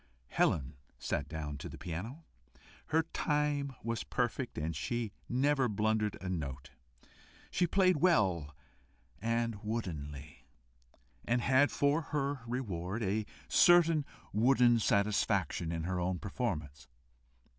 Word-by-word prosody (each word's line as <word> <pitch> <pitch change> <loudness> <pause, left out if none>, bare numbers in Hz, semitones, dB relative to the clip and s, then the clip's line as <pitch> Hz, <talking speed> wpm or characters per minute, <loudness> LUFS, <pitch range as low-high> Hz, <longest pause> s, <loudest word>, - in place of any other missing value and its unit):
Helen 70 -1 +1 0.2
sat 70 - -2
down 75 -3 -5
to - - -6
the - - -9
piano. 105 - -6 0.6
Her 160 +1 +2
time 150 -3 -1
was 115 0 -2
perfect, 125 0 -2
and 80 +1 -2
she 110 +9 -2 0.2
never 135 0 +2
blundered 105 0 0
a 95 - -6
note. 70 -7 -4 0.8
She 175 - +2
played 185 -1 +3
well 95 - +2 0.7
and 115 -1 -1
woodenly, 75 -10 -5 0.8
and 120 +1 +1
had 135 +3 +4
for 145 +3 +2
her 145 -3 -2
reward 110 -4 -3
a 105 +2 -1 0.2
certain 165 -3 +5 0.3
wooden 120 +1 +5
satisfaction 100 -5 +1
in 80 -1 -3
her 90 +1 -1
own 90 +1 0
performance. 90 - -4
110 Hz, 115 wpm, -33 LUFS, 85-135 Hz, 0.8 s, certain